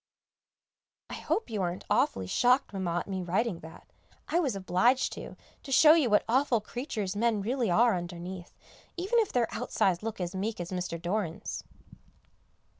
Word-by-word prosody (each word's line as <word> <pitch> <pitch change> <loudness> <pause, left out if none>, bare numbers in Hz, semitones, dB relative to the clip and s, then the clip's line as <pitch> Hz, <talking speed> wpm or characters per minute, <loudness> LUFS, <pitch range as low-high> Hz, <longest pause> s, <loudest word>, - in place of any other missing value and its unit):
I - - -5
hope 440 - -2
you 210 -3 -1
aren't 175 0 -3
awfully 95 - +1
shocked, 250 - +2
Mamma, 175 -3 -1
at - - -10
me 190 -2 -3
writing 185 +2 -1
that; 160 +1 -12 0.4
I 340 - +2
was 275 - 0
obliged 195 +7 +2
to, - - -9 0.2
to 275 - -9
show 305 +3 +8
you 310 -7 +3
what 210 - +4
awful 255 0 +2
creatures 215 -3 -4
men 225 0 +1
really 240 0 0
are 225 +4 +4
underneath, 175 +1 -7 0.4
even 390 +7 +1
if 440 - +1
their 240 -2 +2
outsides 180 -3 0
look 220 -1 -5
as 180 0 -3
meek 205 +3 -3
as 175 +1 -5
Mr. 180 -2 -3
Doran's. 175 -1 -3
205 Hz, 165 wpm, -29 LUFS, 180-245 Hz, 0.4 s, show